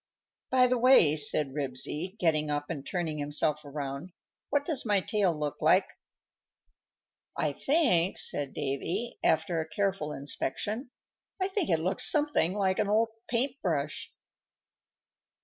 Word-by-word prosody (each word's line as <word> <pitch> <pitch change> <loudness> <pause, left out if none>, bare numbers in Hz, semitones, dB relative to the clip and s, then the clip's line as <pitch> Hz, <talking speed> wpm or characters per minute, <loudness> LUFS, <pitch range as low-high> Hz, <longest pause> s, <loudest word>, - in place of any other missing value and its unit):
_ - - -64
"By 255 -1 +5
the 250 -1 +1
way," 235 - +6
said 145 -2 +1
Ribsy, 145 +7 -2
getting 155 -5 +1
up 145 +2 -2
and 145 -5 -5
turning 160 -3 -3
himself 150 +1 0
around, 145 +3 -6 0.4
"what 285 0 +1
does 305 -5 +1
my 205 -3 +2
tail 195 -1 +1
look 150 -3 -4
like?" - - +4 1.5
"I 150 -2 0
think," 240 - +2
said 140 -2 -1
Davy, 160 - -3
after 160 +1 +1
a 160 - -7
careful 185 -2 -1
inspection, 205 - -3 0.5
"I 375 0 0
think 390 - -1
it 165 -3 +2
looks 180 +4 +2
something 295 - +1
like 195 -1 0
an 210 - +1
old 225 +2 +3 0.2
paint 255 +3 -1
brush." 155 -4 -2
170 Hz, 140 wpm, -29 LUFS, 150-220 Hz, 1.5 s, way